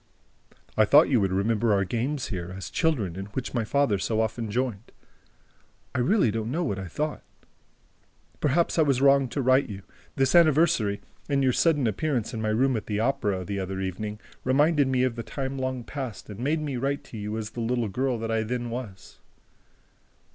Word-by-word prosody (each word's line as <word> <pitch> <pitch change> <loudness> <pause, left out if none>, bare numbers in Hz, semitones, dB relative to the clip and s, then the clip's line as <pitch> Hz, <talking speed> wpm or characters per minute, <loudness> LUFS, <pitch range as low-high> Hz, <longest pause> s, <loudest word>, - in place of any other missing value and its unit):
"I 110 - +5
thought 145 +9 +6
you 125 -6 +3
would 95 -1 +1
remember 110 +4 +1
our 100 -1 +2
games 125 +6 -2
here, 90 -3 -4
as 95 - -7
children, 125 - 0
in 95 +1 -5
which 130 - -3
my 120 -3 0
father 115 -3 +1
so 110 +3 -1
often 110 0 -1
joined. 120 -2 -2 1.0
I - - -1
really 130 - +3
don't 110 +1 -3
know 165 +7 -1
what 100 - -2
I 95 - -5
thought... 150 - -3 1.2
Perhaps 165 +4 +1
I - - +7
was 140 -5 +3
wrong 140 0 +5
to 140 +2 -2
write 130 +2 +4
to 105 - -6
you... 95 0 -9 0.3
This 135 -1 +2
anniversary 155 -11 +4 0.3
and 140 -1 +2
your 130 -1 +3
sudden 150 -3 +2
appearance 120 +2 -1
in 110 - -3
my 110 - 0
room 125 +4 +2
at 110 - -4
the 105 -1 -1
Opera, 105 -6 0
the 100 +1 -3
other 95 0 -4
evening, 105 +3 -4 0.2
reminded 145 +2 +3
me 130 -1 +2
of 130 -2 0
the 115 - -4
time 135 +2 -4
long 130 -1 -2
past 125 -6 -6
and 105 - -9
made 150 +5 0
me 145 -4 -3
write 140 +3 -1
to 115 - -10
you 105 +1 -4
as 110 -1 -5
the 120 - -5
little 120 0 0
girl 125 +4 -1
that 115 0 -3
I 110 0 +1
then 120 +1 -3
was..." 115 -6 -8
120 Hz, 200 wpm, -26 LUFS, 105-135 Hz, 1.2 s, I